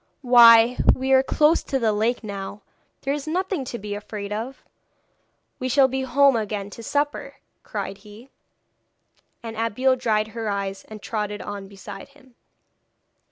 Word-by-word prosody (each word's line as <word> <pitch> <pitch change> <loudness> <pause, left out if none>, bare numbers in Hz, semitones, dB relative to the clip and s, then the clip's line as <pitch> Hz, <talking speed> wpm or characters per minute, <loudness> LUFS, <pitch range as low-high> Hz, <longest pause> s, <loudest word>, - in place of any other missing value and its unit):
'Why 235 -1 +7 0.2
we 265 +1 -2
are 265 0 +6
close 300 +4 +3
to 275 - -2
the 225 -4 +1
lake 225 +4 0
now. 200 -1 -7 0.4
There 275 - -1
is 290 0 -5
nothing 365 -1 -1
to 240 - -5
be 210 -1 -6
afraid 205 0 -6
of! 230 +6 -6 1.0
We 255 - -2
shall 270 +1 +5
be 265 0 -3
home 275 +1 +4
again 205 -2 -3
to 230 - -10
supper,' 290 +5 -2 0.3
cried 195 - -6
he. 210 +5 -15 1.1
And 225 -1 -7
Abeille 230 +4 +1
dried 220 -3 0
her 225 -1 -4
eyes, 195 -1 -4
and 215 -2 -11
trotted 210 -2 -4
on 200 -1 -7
beside 195 0 -10
him. 260 -3 -22
230 Hz, 155 wpm, -23 LUFS, 210-265 Hz, 1.1 s, Why